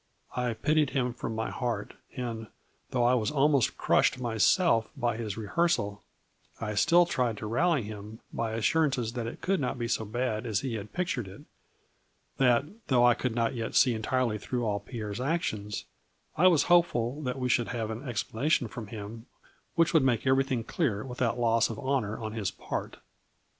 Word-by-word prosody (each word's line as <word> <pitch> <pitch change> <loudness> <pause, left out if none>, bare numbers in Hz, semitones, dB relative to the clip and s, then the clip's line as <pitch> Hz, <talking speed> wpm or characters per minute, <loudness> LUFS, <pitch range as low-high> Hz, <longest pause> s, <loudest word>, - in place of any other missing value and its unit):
I 125 -2 -1
pitied 150 +2 +2
him 125 -2 0
from 115 -1 -5
my 110 0 -2
heart, 120 -5 -3 0.2
and, 115 -4 -4 0.4
though 125 -2 +1
I 120 +1 +4
was 115 -4 +1
almost 145 -3 +2
crushed - - +3
myself 115 - +3
by 120 -4 0
his 110 -3 -4
rehearsal, 105 - 0 0.6
I 105 -2 -3
still 170 - +5
tried 125 -9 0
to 105 - -6
rally 145 +5 +2
him 105 +1 -8
by 115 -1 -2
assurances 125 0 +1
that 120 -2 -3
it 115 - -7
could 195 -1 +1
not 130 -2 -2
be 120 -1 -2
so 110 - 0
bad 110 +1 -2
as 105 -3 0
he 130 -3 -3
had 105 -1 -5
pictured 170 - -2
it; 95 - -11 1.0
that, 125 0 +4 0.2
though 120 -3 +4
I 120 - +7
could 120 -1 -2
not 115 0 +1
yet 115 -3 -4
see 125 -3 +5
entirely 115 0 0
through 120 +4 -2
all 105 -2 0
Pierre's 105 0 -6
actions, 125 - -2 0.5
I 180 - +5
was 170 -5 +5
hopeful 155 -7 +2
that 125 -2 -3
we 125 -1 -1
should 120 -1 +2
have 115 -3 -3
an 110 +2 -5
explana 120 +1 -2
tion 125 -7 +2
from 110 -2 -7
him 110 +2 -8 0.5
which 165 0 +3
would 160 - +6
make 125 -3 +1
everything 130 -2 +2
clear 115 - -1
without 125 -2 -1
loss 115 -2 +3
of 115 - -5
honor 130 -6 -1
on 110 -2 -5
his 105 -4 -1
part. - - -5
120 Hz, 185 wpm, -29 LUFS, 110-135 Hz, 1.0 s, I